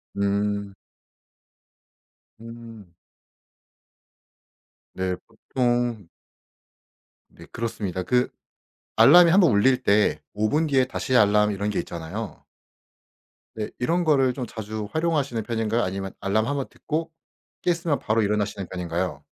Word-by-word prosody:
음. 100 Hz, 0 st, -1 dB, 1.7 s
음. 115 Hz, -5 st, -11 dB, 2.0 s
네 95 Hz, -1 st, -1 dB
보통 120 Hz, -5 st, -1 dB, 1.2 s
네 -, -, -15 dB
그렇습니다. 100 Hz, -6 st, -3 dB
그 125 Hz, +3 st, +1 dB, 0.7 s
알람이 165 Hz, +10 st, +8 dB
한번 180 Hz, -3 st, +5 dB
울릴 125 Hz, +5 st, +3 dB
때 105 Hz, -2 st, +2 dB
5 110 Hz, +1 st, +1 dB
분 155 Hz, +6 st, +1 dB
뒤에 135 Hz, -3 st, +3 dB
다시 130 Hz, 0 st, -1 dB
알람 105 Hz, -1 st, +4 dB
이런 100 Hz, 0 st, -2 dB
게 -, -, -1 dB
있잖아요. 90 Hz, +5 st, -7 dB, 1.1 s
네 110 Hz, -1 st, -4 dB
이런 170 Hz, +8 st, 0 dB
거를 135 Hz, -5 st, +3 dB
좀 125 Hz, -1 st, -5 dB
자주 110 Hz, -1 st, -6 dB
활용하시는 150 Hz, -8 st, 0 dB
편인가요? 115 Hz, +1 st, -1 dB
아니면 95 Hz, +1 st, -3 dB
알람 110 Hz, +3 st, 0 dB
한번 140 Hz, -1 st, -2 dB
듣고 160 Hz, +1 st, -4 dB, 0.5 s
깼으면 170 Hz, -4 st, 0 dB
바로 110 Hz, 0 st, +1 dB
일어나시는 105 Hz, -2 st, -1 dB
편인가요? 85 Hz, -4 st, -3 dB
110 Hz, 230 characters per minute, -24 LUFS, 100-130 Hz, 2.0 s, 알람이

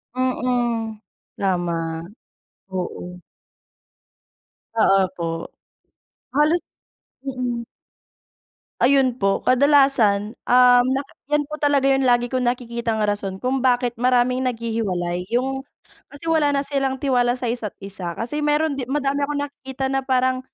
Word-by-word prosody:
Mm. 240 Hz, -3 st, -1 dB, 0.4 s
Tama. 175 Hz, -3 st, 0 dB, 0.9 s
Oo. 180 Hz, -1 st, -5 dB, 1.5 s
Ah, 195 Hz, -3 st, +4 dB
opo. 170 Hz, -2 st, -5 dB, 0.8 s
Halos 300 Hz, +5 st, +3 dB, 0.7 s
mm. 250 Hz, -3 st, -3 dB, 1.2 s
Ayun 265 Hz, 0 st, +4 dB
po, 195 Hz, 0 st, +1 dB
kadalasan, 255 Hz, -6 st, +3 dB
um, 245 Hz, 0 st, +6 dB
naka 275 Hz, +1 st, -4 dB, 0.2 s
'yan 295 Hz, 0 st, +2 dB
po 305 Hz, -, -5 dB
talaga 280 Hz, -2 st, +3 dB
yung 270 Hz, -1 st, +2 dB
lagi 245 Hz, 0 st, +2 dB
kong 255 Hz, -2 st, 0 dB
nakikitang 235 Hz, -3 st, -1 dB
rason 205 Hz, -2 st, -1 dB
kung 255 Hz, +6 st, -1 dB
bakit 245 Hz, -1 st, +2 dB
maraming 250 Hz, 0 st, +2 dB
naghihiwalay. 195 Hz, -7 st, -2 dB
Yung 265 Hz, +2 st, -1 dB, 0.4 s
kasi 325 Hz, +3 st, -5 dB
wala 295 Hz, -3 st, +3 dB
na 275 Hz, -, +1 dB
silang 275 Hz, -2 st, 0 dB
tiwala 250 Hz, -3 st, +1 dB
sa 245 Hz, -2 st, -2 dB
isa't 230 Hz, -4 st, -5 dB
isa. 185 Hz, -3 st, -4 dB
Kasi 245 Hz, -, -3 dB
meron 295 Hz, -1 st, +1 dB
'di 250 Hz, -, -4 dB
madami 280 Hz, 0 st, 0 dB
akong 290 Hz, -1 st, -2 dB
nakikita 265 Hz, -1 st, -6 dB
na 270 Hz, -, +1 dB
parang, 260 Hz, -1 st, +1 dB
250 Hz, 120 wpm, -22 LUFS, 220-270 Hz, 1.5 s, um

